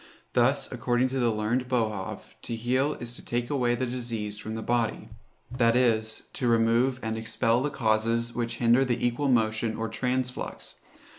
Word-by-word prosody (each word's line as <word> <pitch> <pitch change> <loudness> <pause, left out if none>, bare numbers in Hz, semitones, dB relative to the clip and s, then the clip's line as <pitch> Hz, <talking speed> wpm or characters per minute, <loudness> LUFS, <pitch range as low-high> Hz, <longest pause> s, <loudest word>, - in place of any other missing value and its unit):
Thus, - - +3
according 125 +1 +1
to 135 +1 -2
the 120 -2 +3
learned 110 +4 -1
Boerhaave, 110 -6 -2
to 115 - -4
heal 130 +6 +1
is 120 -2 -6
to - - -8
take 120 +1 -2
away 125 -4 +2
the 130 - -1
disease 115 -4 -3
from 110 0 -5
the 110 - -4
body; 120 -2 -1 0.4
that 120 -2 +3
is, 110 -3 +1
to 125 - -1
remove 115 +3 +3
and 110 0 -2
expel 115 +1 +1
the 145 - 0
causes 115 -2 0
which 115 -1 -2
hinder 120 +2 +4
the 125 -2 0
equal 120 +4 0
motion 110 -2 +1
or 115 - -2
transflux. 125 +2 -3
120 Hz, 170 wpm, -27 LUFS, 110-125 Hz, 0.4 s, hinder